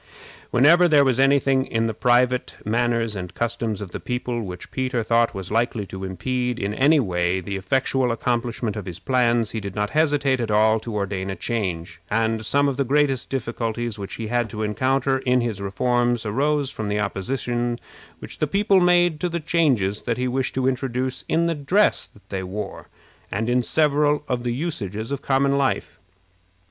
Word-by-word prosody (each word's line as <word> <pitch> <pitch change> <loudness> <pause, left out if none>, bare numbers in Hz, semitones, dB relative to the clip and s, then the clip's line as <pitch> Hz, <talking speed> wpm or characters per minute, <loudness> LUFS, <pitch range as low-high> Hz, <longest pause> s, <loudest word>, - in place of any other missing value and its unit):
Whenever 165 +8 +5
there 150 -4 +5
was 130 -2 +1
any 135 +1 +5
thing 135 -1 +2
in 115 -3 -1
the 110 - -1
private 125 +2 +2
manners 115 0 0
and 90 -1 -6
customs 115 -3 -2
of 95 -3 -7
the - - -5
people 125 -1 -3
which 90 -4 -8
Peter 130 -3 -1
thought 115 0 +2
was 95 -1 -6
likely 115 -1 0
to 95 0 -8
impede 125 +6 -2
in 100 -1 -2
any 145 +7 +4
way 90 -5 0
the 100 +2 -5
effectual 125 +5 0
accomplishment 115 -2 -1
of 105 -4 -6
his 90 -2 -6
plans, 120 0 +1
he 110 - -3
did 100 -2 -7
not 105 0 -1
hesitate 145 -4 +2
at 115 - -2
all 110 +1 +4
to 110 0 -6
ordain 100 -2 -2
a 95 - -3
change; 95 -8 -3
and 110 0 0
some 140 0 +3
of 135 -2 -1
the 140 - +2
greatest 135 -1 +1
difficulties 120 -3 -3
which 100 - -6
he 115 - -5
had 120 +1 0
to 110 -1 -4
encounter 130 +5 +1
in 125 -1 +2
his 115 -5 -2
reforms 120 +4 0
arose 140 +5 0
from 110 -2 -4
the 105 0 0
opposition 120 +4 -2 0.4
which - - -9
the 155 - +1
people 200 +3 +3
made 175 -3 +3
to 180 - -1
the 170 0 -2
changes 135 - +1
that 115 -2 -2
he 125 0 -1
wished 130 +1 -2
to 130 0 +1
introduce 130 0 -2
in 165 +1 +2
the 170 - +1
dress 175 +8 +2
that 105 - -23
they 95 -1 -3
wore, 95 +2 -6 0.4
and 110 +3 -1
in 125 +1 +2
several 150 +2 +2
of 125 -2 -1
the 120 0 -2
usages 115 - -4
of 140 -1 -3
common 140 +1 +2
life. 135 -1 -1
120 Hz, 190 wpm, -23 LUFS, 105-135 Hz, 0.4 s, Whenever